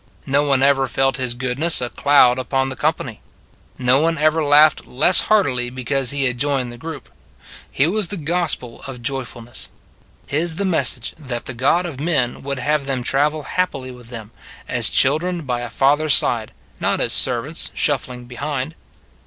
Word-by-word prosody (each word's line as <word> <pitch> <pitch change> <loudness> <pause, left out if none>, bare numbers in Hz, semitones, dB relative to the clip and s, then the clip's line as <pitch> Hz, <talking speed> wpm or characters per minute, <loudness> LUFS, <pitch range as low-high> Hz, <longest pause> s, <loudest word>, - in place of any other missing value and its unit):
No 140 +2 +2
one 135 -2 +2
ever 135 -1 +3
felt 135 +1 0
His 125 -2 -2
goodness 130 +7 +1
a 125 -1 -4
cloud 130 -3 +4
upon 135 +1 -1
the 130 - -5
company. 145 -7 -2 0.6
No 130 +1 +3
one 165 +2 +1
ever 155 +1 +2
laughed 150 +1 +4
less 150 +8 +5
heartily 130 -13 +2
because 130 +1 -2
He 140 0 -1
had 125 -2 -1
joined 135 -3 -1
the 120 - -11
group. 160 +1 -8 0.6
His 140 - +2
was 210 -2 0
the 200 - -5
gospel 155 -7 -1
of 125 -3 -8
joyfulness; 120 -2 -5 0.6
His 160 +3 0
the 200 +3 -2
message 140 -9 0
that 125 -5 -6
the 130 - -6
God 140 +9 +1
of 150 -7 -6
men 140 -6 -1
would 140 0 -4
have 145 +2 -1
them 130 -3 -2
travel 150 +4 +1
happily 140 -7 -2
with 125 -2 -13
Him, 115 -3 -9 0.4
as - - +1
children 165 +5 +1
by 125 -3 -2
a 120 - -5
Father 140 +6 +2
s 150 - +5
side, - - 0 0.3
not - - 0
as - - 0
servants - - +2
shuffling 125 -1 -2
behind. 140 +3 -4
135 Hz, 175 wpm, -20 LUFS, 125-155 Hz, 0.6 s, less